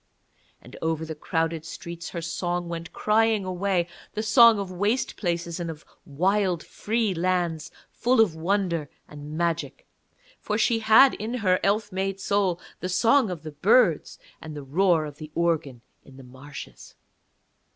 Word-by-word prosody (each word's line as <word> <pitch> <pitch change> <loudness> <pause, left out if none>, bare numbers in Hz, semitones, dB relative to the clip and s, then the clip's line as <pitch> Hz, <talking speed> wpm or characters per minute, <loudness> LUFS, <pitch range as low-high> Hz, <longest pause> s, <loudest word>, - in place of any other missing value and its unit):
And - - -13
over 160 0 -1
the 160 - -5
crowded 165 +1 -2
streets 170 +1 -8
her 170 - -6
song 175 +1 -2
went 165 -1 -6
crying 215 -1 +2
away, 185 -1 0 0.3
the 215 - -2
song 225 +1 +7
of 195 -2 -4
waste 205 +7 -1
places 170 -2 -3
and 170 -1 -3
of 155 -2 -9 0.2
wild 185 +3 0
free 220 -2 -1
lands, 175 -2 -1 0.2
full 250 +1 +1
of 215 -7 +4
wonder 170 -3 -1 0.2
and 150 +1 -9
magic, 170 - -2 0.5
for 210 - -2
she 225 +1 +2
had 225 +5 +6
in 220 +4 -4
her 185 -6 +2
elf 210 +1 0
made 195 +1 -2
soul 195 -3 0 0.2
the 185 - -4
song 230 +6 +3
of 170 -4 -6
the 155 - -7
birds 170 - +2 0.2
and 155 -1 -8
the 145 - -7
roar 165 +3 +2
of 145 -1 -9
the 155 -1 -8
organ 160 -7 -1 0.2
in 135 -1 -16
the 135 - -12
marshes. 130 +3 -11
175 Hz, 160 wpm, -25 LUFS, 160-205 Hz, 0.5 s, song